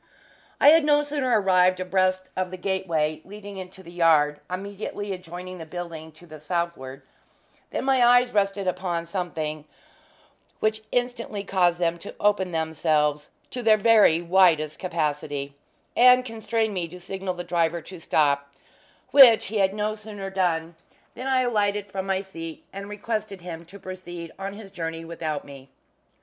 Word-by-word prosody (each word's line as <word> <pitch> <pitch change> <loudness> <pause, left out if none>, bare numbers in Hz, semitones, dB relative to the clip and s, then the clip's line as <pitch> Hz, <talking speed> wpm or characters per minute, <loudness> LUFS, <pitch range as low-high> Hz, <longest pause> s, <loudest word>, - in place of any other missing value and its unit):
I 285 - +8
had 320 +1 +6
no 295 0 +4
sooner 275 -6 +1
arrived 185 -1 +3
abreast 185 0 0
of 185 -1 -1
the 185 - -7
gateway 170 -5 -1
leading 205 0 -10
into 190 0 -9
the 170 - -12
yard 155 -4 +3
immediately 200 +2 -5
adjoining 180 0 -8
the 165 - -7
building 165 -2 -7
to 165 +3 -16
the 155 -2 -11
southward, 150 -4 -4 0.7
than - - -3
my 265 -2 +4
eyes 245 +1 +5
rested 200 -1 +1
upon 180 -2 -2
something 160 -4 -4 1.0
which 215 0 0
instantly 245 -4 -2
caused 180 -3 +2
them 170 -1 0
to 200 - -9
open 200 -3 +2
themselves 155 -2 0 0.2
to 250 - -4
their 220 -2 +5
very 210 -6 +5
widest 170 -4 +3
capacity, 150 -5 -2 0.4
and 250 +1 +6
constrained 225 -1 -1
me 180 -3 -2
to 180 +2 -11
signal 190 +1 -4
the 175 - -5
driver 170 -1 0
to 185 -2 -10
stop; 140 -3 +1 0.6
which 255 -5 +8
he 210 +1 -2
had 190 -1 +3
no 210 0 -1
sooner 210 -2 -7
done 170 -3 0 0.4
than 255 - -6
I 260 -1 +3
alighted 205 -4 0
from 190 0 -4
my 190 0 0
seat 165 -5 -9
and 200 +1 -7
requested 210 -2 -4
him 170 -1 -8
to 185 +4 -12
proceed 175 -3 -8
on 195 +1 -4
his 200 -1 -11
journey 165 -3 -5
without 160 -3 -4
me. 135 -1 -12
185 Hz, 160 wpm, -25 LUFS, 165-205 Hz, 1.0 s, I